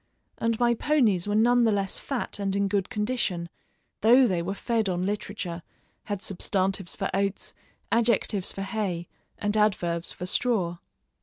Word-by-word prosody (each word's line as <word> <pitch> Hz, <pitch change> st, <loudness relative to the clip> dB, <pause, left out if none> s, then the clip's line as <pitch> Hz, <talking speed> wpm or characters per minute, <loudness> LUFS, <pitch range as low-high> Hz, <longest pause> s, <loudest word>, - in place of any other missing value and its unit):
And 230 Hz, -1 st, 0 dB
my 240 Hz, -1 st, +4 dB
ponies 230 Hz, -, +2 dB
were 205 Hz, -, 0 dB
none 240 Hz, +2 st, +5 dB
the 225 Hz, -, +4 dB
less 195 Hz, -2 st, 0 dB
fat 265 Hz, -6 st, -4 dB
and 195 Hz, -1 st, -1 dB
in 200 Hz, 0 st, +2 dB
good 195 Hz, -1 st, 0 dB
condition 210 Hz, -7 st, -1 dB, 0.5 s
though 245 Hz, +4 st, +6 dB
they 185 Hz, -7 st, +1 dB
were 195 Hz, +4 st, -3 dB
fed 225 Hz, -2 st, 0 dB
on 180 Hz, 0 st, -1 dB
literature, 200 Hz, -3 st, -3 dB, 0.4 s
had 205 Hz, -1 st, -4 dB
substantives 195 Hz, -1 st, -1 dB
for -, -, -1 dB
oats, 195 Hz, 0 st, -1 dB, 0.4 s
adjectives 230 Hz, -4 st, +2 dB
for 195 Hz, -, -5 dB
hay, 195 Hz, -4 st, -2 dB, 0.3 s
and 205 Hz, -1 st, 0 dB
adverbs 180 Hz, -5 st, +1 dB
for 180 Hz, -, -6 dB
straw. 185 Hz, -5 st, 0 dB
200 Hz, 155 wpm, -27 LUFS, 185-225 Hz, 0.5 s, though